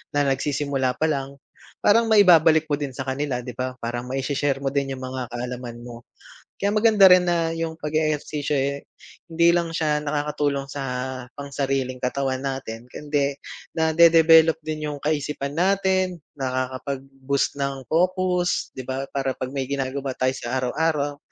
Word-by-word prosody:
na 145 -1 +2
nagsisimula 135 -1 -1
pa 160 0 0
lang, 140 -1 -3 0.5
parang 230 +2 +5
maibabalik 170 -7 +6
mo 145 - +1
din 140 -4 -4
sa 135 - -4
kanila, 130 -2 -2
di 125 - -6
ba? 130 +2 -4
Parang 120 +1 -3
mai-she-share 135 +1 -1
mo 135 - 0
din 140 -1 -1
yung 130 - -9
mga 130 -1 -4
kaalaman 120 -1 -6
mo. 120 -1 -11 0.5
Kaya 200 +1 +1
maganda 215 -2 +6
rin 180 0 +6
na 170 -2 +1
yung 165 -1 -2
page-ehersisyo 150 -1 -1
eh, 140 +1 -2 0.4
hindi 170 +1 +4
lang 170 -1 0
siya 155 -2 +1
nakakatulong 145 -1 -1
sa 140 +1 -5 0.6
pang-sariling 135 -2 -2
katawan 130 +1 -1
natin 130 -4 -5
kundi, 145 0 -1 0.4
nadedebelop 160 0 +6
din 155 -1 -4
yung 145 - -5
kaisipan 145 -2 -2
natin, 185 -2 +1 0.2
nakakapag-boost 135 +1 -2
ng 140 -1 -2
focus, 180 +1 +1
di 130 - -3
ba? 135 +1 -3
Para 135 -1 -1
pag 130 - -4
may 135 -2 -2
ginagawa 135 0 -2
tayo 130 0 +1
sa 120 +2 -3
araw-araw, 145 +2 0
140 Hz, 150 wpm, -23 LUFS, 130-160 Hz, 0.6 s, maibabalik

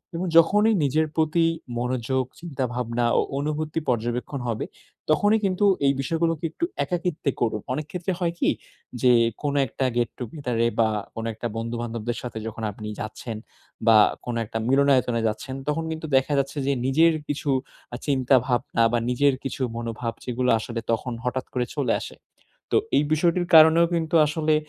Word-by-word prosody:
এবং 175 +2 -2
যখনই 210 +7 +5
নিজের 155 +3 +2
প্রতি 160 +1 +2 0.3
মনোযোগ, 130 +1 -1 0.2
চিন্তাভাবনা 125 -6 -2
ও - - +4 0.2
অনুভূতি 155 +2 -2
পর্যবেক্ষণ 120 +3 -2
হবে, 115 -2 -2 0.5
তখনই 205 +7 +3
কিন্তু 190 +1 +1 0.2
এই 140 - +4
বিষয়গুলোকে 165 +3 -1
একটু 340 - -2 0.2
একাকিত্বে 175 -5 -2
করুন। 110 -3 0
অনেক 150 +2 -3
ক্ষেত্রে 180 +1 -2
হয় 170 -2 0
কি - - +3 0.5
যে, 125 -1 +5 0.3
কোন 145 - 0
একটা 130 +3 -2
গেট-টুগেদারে 120 0 -1
বা 110 - +4 0.3
কোন 115 - -4
একটা 115 +2 -4
বন্ধু 115 +1 -3
বান্ধবদের 120 0 -4
সাথে 120 -3 -6
যখন 115 0 -6
আপনি 105 +1 -8
যাচ্ছেন, 110 +1 -6 0.5
বা 110 - +8 0.3
কোন 120 -1 -3
একটা 110 - -5
মিলনায়তনে 130 -3 +3
যাচ্ছেন, 130 +5 -4
তখন 150 +2 0
কিন্তু 160 0 -5
দেখা 135 +3 +1
যাচ্ছে 140 +2 -3
যে, 140 - +3
নিজের 160 +5 +4
কিছু 145 0 -3 0.4
আ - - -3
চিন্তাভাবনা 130 -3 +2
বা 120 - +3
নিজের 140 +3 +3
কিছু 135 0 -5 0.2
মনোভাব, 115 0 -4
যেগুলো 125 0 -1
আসলে 115 +1 -5
তখন 120 +2 -1
হঠাৎ 130 +1 -2
করে 125 -1 0
চলে 135 -6 +1
আসে। - - -8 0.6
তো - - +4 0.2
এই 145 - +4
বিষয়টির 175 +3 +1
কারণেও 160 +2 +8
কিন্তু 165 0 -1
আসলে 155 0 +1
135 Hz, 160 wpm, -24 LUFS, 120-160 Hz, 0.6 s, বা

